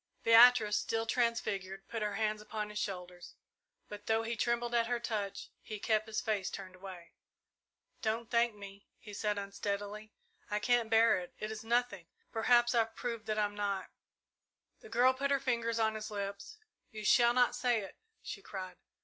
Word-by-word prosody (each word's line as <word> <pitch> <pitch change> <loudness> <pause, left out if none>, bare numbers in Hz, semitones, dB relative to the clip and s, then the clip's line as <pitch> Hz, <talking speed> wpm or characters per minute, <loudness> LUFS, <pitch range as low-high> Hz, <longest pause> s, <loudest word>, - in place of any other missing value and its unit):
Beatrice, 230 -2 +7
still 225 0 -1
transfigured, 200 -5 -1
put 225 -2 -4
her 210 -1 -1
hands 215 0 -1
upon 210 0 -5
his 210 - -4
shoulders; 180 -2 -6 0.5
but, 205 0 -10
though 225 0 +2
he 230 +1 -2
trembled 235 +1 0
at 230 -1 +2
her 245 0 0
touch, 210 -4 -4
he 215 - -7
kept 215 +1 0
his 220 - -2
face 205 -4 -1
turned 190 -2 -8
away. 185 -2 -11 0.9
"Don't 225 +1 -1
thank 235 -2 +2
me," 200 -1 -11
he 210 - -12
said 210 0 -1
unsteadily. 205 +1 -4 0.4
"I 210 - 0
can't 240 +1 +2
bear 225 -2 +5
it. 180 - -10
It 215 0 -4
is 220 0 -6
nothing. 240 +2 0 0.2
Perhaps 240 +1 +3
I've 225 -1 +1
proved 230 -3 -4
that 215 0 -1
I'm 205 -1 +1
not 200 -2 -3 0.4
" - - -53
The 445 - -13
girl 255 - +4
put 280 +2 -1
her 280 -1 +3
fingers 235 -3 -1
on 220 -1 +2
his 215 0 -5
lips. 200 - -5 0.3
"You 215 -2 -8
shall 240 +2 +5
not 250 -1 +4
say 245 -3 +1
it!" 195 - -9 0.3
she 200 - -6
cried. 185 -2 -7
220 Hz, 180 wpm, -33 LUFS, 205-235 Hz, 0.9 s, Beatrice